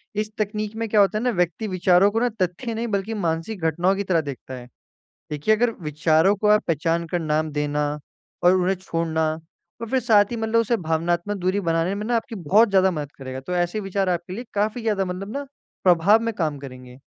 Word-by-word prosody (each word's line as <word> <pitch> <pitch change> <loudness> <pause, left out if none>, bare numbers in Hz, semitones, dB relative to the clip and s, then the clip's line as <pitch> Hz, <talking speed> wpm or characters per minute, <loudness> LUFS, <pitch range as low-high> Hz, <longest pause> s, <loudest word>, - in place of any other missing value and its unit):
इस 210 +1 -2
तकनीक 215 0 -2
में 225 0 -2
क्या 210 0 +3
होता 200 +1 +2
है 215 - -2
ना 250 - +2
व्यक्ति 180 +2 -1
विचारों 185 0 +4
को 225 - 0
ना 245 +1 +2
तथ्य 185 +7 -2
नहीं 230 +2 -3
बल्कि 200 +1 -2
मानसिक 175 0 -2
घटनाओं 175 +4 +1
की 200 - -2
तरह 180 -4 +1
देखता 140 -3 -8
है। 125 -1 -8 0.6
देखिए 150 +9 +2
अगर 235 +2 +1
विचारों 155 +5 +2
को 210 +1 -1
आप 210 0 +4
पहचान 165 +1 0
कर 175 +2 -1
नाम 155 -1 0
देना 145 0 -1 0.6
और 175 +1 +6
उन्हें 185 +1 +1
छोड़ना 165 -3 -1 0.6
और 230 - -5
फिर 260 +1 +2
साथ 220 -4 +4
ही - - -2
मतलब 225 +1 +1
उसे 230 +1 +1
भावनात्मक 170 +4 -1
दूरी 185 +2 0
बनाने 165 +2 0
में 210 +1 -4
ना 240 +1 0
आपकी 230 0 -3
बहुत 205 +5 +3
ज़्यादा 190 -1 +4
मदद 150 -4 -5
करेगा। 130 -1 -6
तो 160 +7 -6
ऐसे 175 +4 0
विचार 195 -1 -1
आपके 175 0 -2
लिए 230 +6 -5
काफ़ी 215 +3 -1
ज़्यादा 210 -4 0
मतलब 185 +3 -5
ना 285 - -3 0.4
प्रभाव 185 +4 +5
में 230 0 -1
काम 160 -7 -2
करेंगे 125 -2 -11
185 Hz, 215 wpm, -23 LUFS, 165-215 Hz, 0.6 s, और